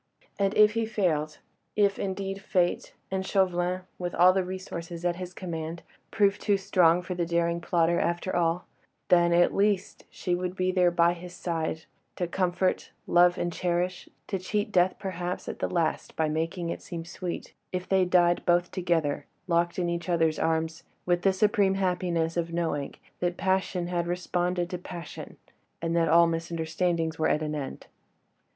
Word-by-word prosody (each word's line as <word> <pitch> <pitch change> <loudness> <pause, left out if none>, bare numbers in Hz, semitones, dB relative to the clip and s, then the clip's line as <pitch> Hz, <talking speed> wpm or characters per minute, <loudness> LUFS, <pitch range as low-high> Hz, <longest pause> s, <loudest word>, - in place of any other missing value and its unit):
And 200 +1 +1
if 210 0 +7
he 225 0 -1
failed—if 195 +2 -1
indeed 195 0 -3
Fate, 180 -2 0 0.2
and 190 0 -1
Chauvelin, 185 -2 +1 0.2
with 175 -1 -3
all 180 +2 +6
the 190 0 +1
resources 175 -2 -6
at 175 -1 +1
his 180 -1 -6
command, 165 -2 -5 0.3
proved 205 -1 +2
too 205 -2 +2
strong 180 -3 +3
for 180 - -4
the 175 -1 -1
daring 170 0 0
plotter 170 0 +2
after 175 +2 -1
all—then 175 0 0
at 175 +1 +4
least 200 -1 0
she 180 - -3
would 180 +1 -2
be 185 0 +1
there 180 -1 +4
by 170 0 +3
his 175 +1 -10
side, 160 -2 -3 0.3
to 180 - -1
comfort, 185 +1 0 0.2
love 175 +1 +5
and 175 -1 -2
cherish, 180 +1 -1 0.2
to 195 - -3
cheat 205 +3 -2
death 180 -1 +3
perhaps 180 -1 -4
at - - -5
the - - -1
last 165 -2 -1
by 160 - +1
making 165 +2 -2
it - - -5
seem 165 -2 -6
sweet, 175 0 -6 0.2
if 185 0 -3
they 190 -1 +3
died 175 -1 +3
both 175 0 +2
together, 170 -6 0 0.2
locked 170 -1 +1
in 180 -2 0
each 170 +1 -3
other's 165 -2 +2
arms, 160 0 0 0.2
with 175 -1 +2
the 195 - +4
supreme 195 0 +2
happiness 180 -3 0
of 170 -1 -1
knowing 165 -4 -2 0.2
that 175 0 -1
passion 190 -1 0
had 175 -1 -1
responded 175 0 -1
to 180 -1 -5
passion, 175 -1 -8 0.4
and 165 0 -1
that 165 -2 +3
all 170 +2 +7
misunderstandings 165 0 -1
were 160 - +2
at 155 - +1
an 150 0 -2
end. 145 -3 -5
175 Hz, 170 wpm, -27 LUFS, 170-185 Hz, 0.4 s, if